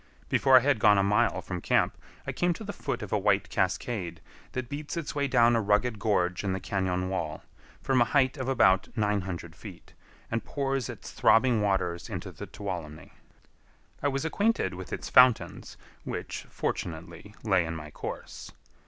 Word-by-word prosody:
Before 135 -1 +5
I - - +6
had 135 -2 +2
gone 105 0 +6
a 100 - +3
mile 105 +3 +2
from 90 -2 -5
camp, - - +2 0.3
I - - -2
came 175 0 +1
to 220 - -9
the 205 -1 -5
foot 140 - -4
of 105 - -6
a 105 - +3
white 100 0 +2
cascade 90 -3 -2 0.3
that 130 -1 -3
beats 145 +5 -5
its 165 -3 -3
way 145 -1 0
down 120 -2 +4
a 115 - +2
rugged 105 +2 +1
gorge 90 -4 +1
in 95 -2 0
the 95 - -2
cañon 95 -1 -1
wall, 80 -5 -3 0.4
from 130 -2 +2
a - - +6
height 130 +1 +2
of 130 -3 -4
about 105 -8 +4
nine 105 -2 +1
hundred 90 -2 -6
feet, - - -12 0.4
and 115 0 -1
pours 135 -3 -2
its - - -8
throbbing 115 -1 +4
waters 95 -4 -1
into - - -5
the - - -9
Tuolumne. 85 -7 -6 0.9
I 145 - +1
was 135 +1 -1
acquainted 205 - +1
with 90 0 -8
its - - -4
fountains, 125 -2 +4 0.3
which, - - -5
fortunately, 85 +4 -5
lay 95 -5 +3
in 80 0 -4
my 75 -2 -8
course. - - -7
105 Hz, 180 wpm, -28 LUFS, 95-130 Hz, 0.9 s, I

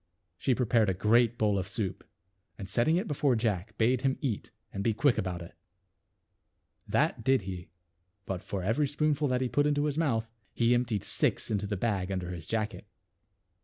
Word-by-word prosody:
She 130 - +2
prepared 115 -4 +2
a 95 - 0
great 115 +4 +3
bowl 105 -2 +2
of 90 - -4
soup, 95 -1 -3 0.5
and 100 - -7
setting 120 - +2
it 195 +5 -1
before 140 -4 +2
Jack 110 -2 -1
bade 120 +2 +3
him 135 0 +1
eat 125 -9 -3 0.2
and 100 - -3
be 110 -1 +1
quick 125 +2 +3
about 90 -2 -3
it. 85 - -12 1.3
That - - +1
did 130 -3 +3
he; 90 -2 -6 0.6
but 95 -2 -3
^ - - -23
ff - - -27
for 95 -2 -3
every 115 +10 +1
spoonful 150 +1 +1
that 125 -1 0
he 130 - +1
put 145 +4 +2
into 145 -1 +2
j - - +1
his 150 +1 -1
mouth 115 -8 +1 0.3
he 120 0 +3
emptied 120 -4 0
six - - -1
into 100 -1 0
the 100 -1 -2
bag 100 -2 -1
under 90 -2 -3
his 85 -3 -7
jacket. 110 -1 -2
115 Hz, 200 wpm, -30 LUFS, 100-130 Hz, 1.3 s, great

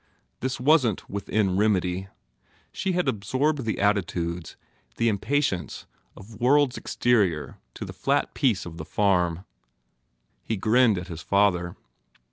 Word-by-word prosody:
This 130 0 -3
wasn 130 - +4
t - - -15
within 100 -1 -1
remedy. 95 -3 +1 0.6
She 190 - -2
had 180 0 0
absorbed 130 +7 0
the 110 - -1
attitudes, 90 -4 -1 0.4
the 115 - +2
impatience 110 -2 -1 0.3
of 105 +2 -13
worlds 140 +1 +4
exterior 100 -11 0 0.2
to - - -6
the - - -8
flat - - 0
peace 120 -9 +1
of 85 -1 -9
the - - -6
farm. 90 -3 +1 1.0
He 110 - -2
grinned 110 +1 +3
at 90 0 -5
his 85 -1 -7
father. 95 -3 +1
105 Hz, 130 wpm, -25 LUFS, 90-125 Hz, 1.0 s, wasn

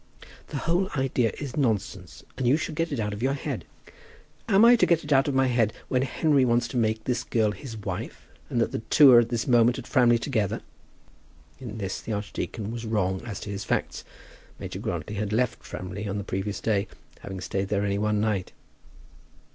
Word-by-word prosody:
"The - - -5
whole 175 +6 0
idea 125 -3 +1
is 140 -4 -5
nonsense, 100 - -2
and 130 -2 -1
you 135 +5 +5
should 160 0 -4
get 165 +1 -1
it 140 - -2
out 105 -1 -1
of 100 - -6
your 135 +2 +1
head." - - -4 0.8
"Am 205 +2 +6
I 240 +1 +8
to - - +3
get 170 -2 +2
it 145 0 0
out 135 +2 +4
of 140 - -1
my 135 0 +4
head 120 -4 +2 0.2
that 130 0 +2
Henry 140 +1 +2
wants 120 -1 +2
to 125 - -4
make 110 -1 +1
this 125 0 -1
girl 110 -3 +1
his 115 +1 -8
wife, 105 - -6 0.2
and 120 - 0
that 115 - +1
the - - -2
two 135 +5 +6
are 120 - +9
at 115 -1 +1
this 120 -2 -1
moment 120 -1 +4
at 130 - -7
Framley 120 -3 +4
together?" 115 -5 -1 1.0
In 115 -4 -7
this 95 -2 -4
the 110 - -4
archdeacon 105 +1 -4
was 115 0 -5
wrong 95 -4 0
as 105 -5 -5
to 100 - -6
his 100 0 -4
facts. - - -2 0.5
Major - - -6
Grantly 105 - -4
had 105 0 -2
left 125 +3 0
Framley 95 +3 -6
on 100 0 -2
the 100 - -3
previous 100 +1 -3
day, 105 -2 0 0.3
having 95 -1 -7
stayed 95 +2 -2
there 100 0 0
only 100 0 0
one 105 0 +1
night. 105 -4 -1
115 Hz, 210 wpm, -26 LUFS, 105-130 Hz, 1.0 s, are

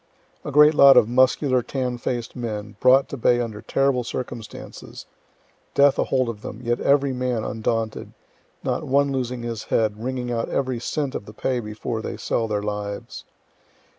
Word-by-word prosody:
A - - -5
great 150 +2 +7
lot 140 -2 +8
of - - +6
muscular, 130 +1 +3
tan 125 -1 -3
faced 120 -1 -3
men, 110 -4 -5
brought 130 +2 +5
to 140 - -5
bay 120 0 +3
under 110 -3 -4
terrible 135 -2 +1
circumstances 120 -2 -7 0.7
death 140 0 +5
ahold 130 -2 +1
of 110 -3 -5
them, 110 - -7
yet 120 0 0
every 140 -1 +2
man 125 -3 -1
undaunted, 110 0 -3 0.5
not - - -1
one 140 +1 +2
losing 125 -2 -3
his 115 -2 -5
head, 110 -1 0
wringing 125 -1 -3
out 115 -1 -2
every 130 -3 -1
cent 140 +3 -2
of - - -5
the 105 - -10
pay 125 +3 -1
before 110 +1 -4
they - - -5
sell 115 - -1
their 105 -1 -2
lives. 105 -1 -5
120 Hz, 165 wpm, -23 LUFS, 110-130 Hz, 0.7 s, lot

